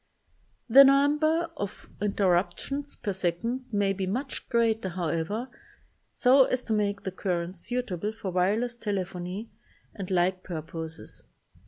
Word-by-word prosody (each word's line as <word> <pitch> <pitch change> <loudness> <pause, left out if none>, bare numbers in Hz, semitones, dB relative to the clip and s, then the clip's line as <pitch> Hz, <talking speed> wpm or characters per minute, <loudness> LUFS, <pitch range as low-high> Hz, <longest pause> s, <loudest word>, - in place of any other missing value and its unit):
The 270 +4 +10
number 300 +4 +3
of 205 0 -6
interruptions 205 +8 0
per 205 -4 -3
second 190 +8 -1
may 200 -2 +2
be 190 -1 -3
much 255 +8 -3
greater, 225 -5 +2
however, 175 +6 -2 0.6
so 260 +1 +5
as 255 0 -1
to 225 - -2
make 205 -1 0
the 190 - -3
currents 180 -1 -3
suitable 215 -4 -3
for 220 -4 -5
wire 185 +4 +2
less 245 0 -3
telephony 195 -1 -4 0.4
and 195 -4 -6
like 185 0 +1
purposes. 160 -2 -7
205 Hz, 130 wpm, -28 LUFS, 180-245 Hz, 0.6 s, The